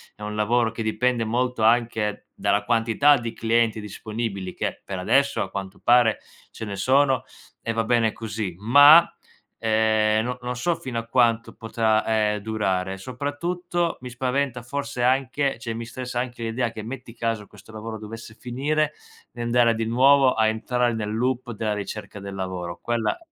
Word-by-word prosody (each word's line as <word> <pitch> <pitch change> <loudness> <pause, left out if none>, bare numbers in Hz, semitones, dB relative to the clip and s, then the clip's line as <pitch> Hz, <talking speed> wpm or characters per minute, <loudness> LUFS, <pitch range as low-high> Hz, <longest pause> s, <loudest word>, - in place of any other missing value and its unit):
è 105 - -19
un 105 0 -4
lavoro 115 +2 +2
che 115 - -6
dipende 115 +1 0
molto 125 +1 -1
anche 110 -2 +1
dalla 100 0 +1
quantità 115 +6 +3
di 115 -1 -5
clienti 115 -1 +1
disponibili, 105 -2 -5
che - - -3
per 95 - -5
adesso, 140 +9 +2
a - - -7
quanto 95 0 -6
pare, 120 -2 +5 0.3
ce 110 - -7
ne 100 - -5
sono 130 +5 +3 0.4
e 115 - -2
va 115 0 0
bene 115 -1 +2
così; 105 -5 -4
ma, 145 - +8 0.5
ehm, 110 -1 +2
no 125 +1 -3
non 125 0 -3
so 170 +8 0
fino 120 -6 -4
a 115 - -7
quanto 115 -2 +2
potrà, 110 -1 0 0.3
ehm, - - -4
durare. 95 -3 -1
Soprattutto, 170 - -3
mi 125 - -7
spaventa 125 0 -1
forse 125 -1 -4
anche 135 +1 +1
cioè 115 -3 -4
mi 115 +1 -5
stressa 125 +1 -5
anche 120 -1 -4
l'idea 115 +1 -1
che, 110 - -7
metti 120 0 -8
caso 115 -3 -3
questo 105 +2 -16
lavoro 110 +1 -6
dovesse 110 +1 -9
finire, 150 +5 -1 0.4
di 120 - -8
andare 120 0 +3
a - - +1
di 115 0 -2
nuovo 130 +3 +5
a 110 - +2
entrare 120 +2 0
nel 105 -1 -3
loop 125 0 -1
della 110 -1 -2
ricerca 105 0 -6
del 100 -1 -7
lavoro. 90 -2 -5
Quella 120 - -1
115 Hz, 170 wpm, -24 LUFS, 110-125 Hz, 0.5 s, ma